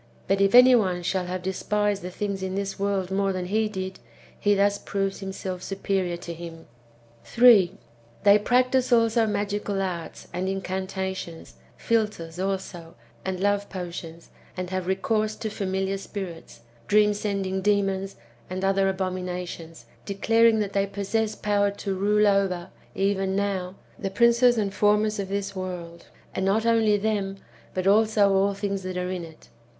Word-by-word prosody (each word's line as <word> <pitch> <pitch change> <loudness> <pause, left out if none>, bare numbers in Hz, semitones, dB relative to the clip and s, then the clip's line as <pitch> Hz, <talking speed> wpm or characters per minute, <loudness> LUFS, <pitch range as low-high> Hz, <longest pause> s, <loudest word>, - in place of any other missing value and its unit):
But 195 +1 +2
if 195 +3 +4
any 250 +1 +9
one 185 -7 +2
shall 180 0 -1
have 180 0 -4
despised 205 +2 0
the 180 - -5
things 200 +1 -3
in 190 0 -3
this 195 0 -3
world 195 -2 -1
more 195 0 +1
than 185 -1 -3
he 215 +3 0
did, 190 -2 -5 0.4
he 205 0 +3
thus 200 0 +2
proves 195 -1 -2
himself 190 -2 -5
superior 190 -2 -2
to 170 0 -7
him. 165 -1 -9 0.6
3. 215 - +5 0.5
They 205 0 +7
practise 255 +3 +2
also 230 -1 +4
magical 205 -1 -2
arts 180 -4 -4
and 185 +2 -2
incantations; 190 -2 -4 0.2
philters, 210 -7 -1
also, 185 -3 -4 0.3
and 190 -1 -3
love 205 +1 0
potions; 170 -3 -7 0.3
and 180 0 -4
have 185 -1 -2
recourse 215 +3 0
to 220 -2 -5
familiar 195 -1 -2
spirits, 190 - -8 0.3
dream 210 0 +4
sending 195 -2 -2
demons, 195 -1 0 0.3
and 185 +1 -3
other 195 0 +2
abominations, 180 -3 -4 0.2
declar 225 +3 +3
ing 225 -1 +4
that 200 -1 -3
they 200 0 +1
possess 210 +2 -1
power 205 -1 +1
to 200 -1 -4
rule 210 +2 +2
over, 195 -3 +1 0.2
even 195 -1 0
now, 195 -2 -2 0.2
the 195 - -2
princes 235 +4 +4
and 200 -3 -1
formers 210 +1 +2
of 195 -1 -3
this 200 0 -3
world; 175 -2 -6 0.3
and 190 - -2
not 205 +4 +1
only 225 -2 +3
them, 200 -2 -1 0.4
but 185 0 -1
also 210 0 +4
all 195 +1 +2
thincrs 200 -1 -2
that 185 -1 -5
are 180 0 -2
in 180 -2 -4
it. 160 -1 -13
195 Hz, 155 wpm, -25 LUFS, 185-205 Hz, 0.6 s, any